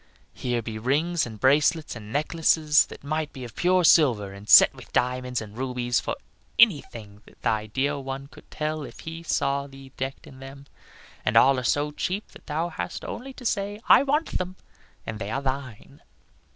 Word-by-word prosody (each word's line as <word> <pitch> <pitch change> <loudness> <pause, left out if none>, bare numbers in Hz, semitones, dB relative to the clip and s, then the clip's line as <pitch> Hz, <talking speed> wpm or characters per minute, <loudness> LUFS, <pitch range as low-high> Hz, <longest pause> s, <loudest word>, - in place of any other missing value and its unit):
Here 120 -2 -2
be 110 -1 -5
rings 150 +7 0
and 110 -2 -10
bracelets 150 +4 +2
and 105 -2 -10
necklaces 155 +1 +3
that - - -12
might 155 +1 -2
be 130 - -9
of 120 -3 -9
pure 180 +1 +3
silver 120 - +4
and 100 +2 -12
set - - +9
with - - -14
diamonds 125 0 0
and 105 -1 -10
rubies, 125 -2 -1
for - - -3 0.4
anything 115 - +2
that - - -19
thy 110 -1 0
dear 140 +6 -1
one 135 0 -6
could 140 - -17
tell 155 0 -3
if 140 - -10
he 165 +1 -7
saw 140 -3 -1
thee 135 -1 -13
decked 135 +1 -5
in 130 - -14
them. 135 +1 -11 0.6
And 105 - +2
all 130 +2 +6
are - - -5
so 145 +4 +1
cheap 185 +7 -3
that - - -17
thou 160 +3 -1
hast 90 - -6
only 270 +3 -6
to 250 - -12
say, 205 -1 -1
'I - - +8
want 290 +3 0
them,' 185 0 -4 0.5
and 110 -1 -5
they 100 -1 -4
are 135 +5 -3
thine." 130 -4 -5
135 Hz, 190 wpm, -25 LUFS, 120-155 Hz, 0.6 s, set